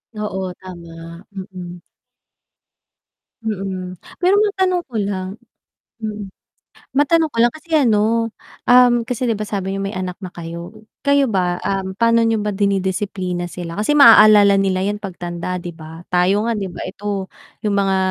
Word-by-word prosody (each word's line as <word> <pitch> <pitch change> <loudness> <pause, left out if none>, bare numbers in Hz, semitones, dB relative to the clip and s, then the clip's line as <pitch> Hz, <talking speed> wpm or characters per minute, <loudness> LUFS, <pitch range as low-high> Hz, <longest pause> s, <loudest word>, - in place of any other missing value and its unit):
Oo, 190 -3 -3
tama. 170 -1 -11
Mm. 185 -3 -8 1.6
Mm. 190 -4 -4 0.2
Pero 375 +3 +4
matanong 380 -4 +1
ko 245 - -13
lang, 190 -2 -3 0.7
hmm. 210 -3 -5 0.7
Matanong 320 +2 +3
ko - - -11
lang 235 +1 +4
kasi 310 +2 -15
ano, 230 -2 +2 0.3
um, 245 -1 +5
kasi 250 0 -2
'di 225 - 0
ba 215 - -3
sabi 195 -2 -3
niyo 195 - -2
may 195 - -4
anak 185 -1 -4
na 185 -3 -9
kayo, 170 +2 -8 0.3
kayo 280 -2 +3
ba, 180 -4 0
um, 195 -1 -2
pa'no 230 +2 +3
niyo 225 -2 +1
ba 210 - -1
dinidisiplina 190 -2 -1
sila? 175 0 -7
Kasi 215 +8 +1
maaalala 215 -7 +8
nila 190 -1 +1
yan 205 +2 -1
pagtanda 180 -2 -5
'di 175 - -6
ba, 160 +1 -10
tayo 180 +3 +2
nga 230 - -1
'di 200 - -2
ba 175 - -7
ito, 200 -2 -4 0.3
yung 205 -1 0
mga 195 -1 +2
200 Hz, 150 wpm, -19 LUFS, 185-225 Hz, 1.6 s, maaalala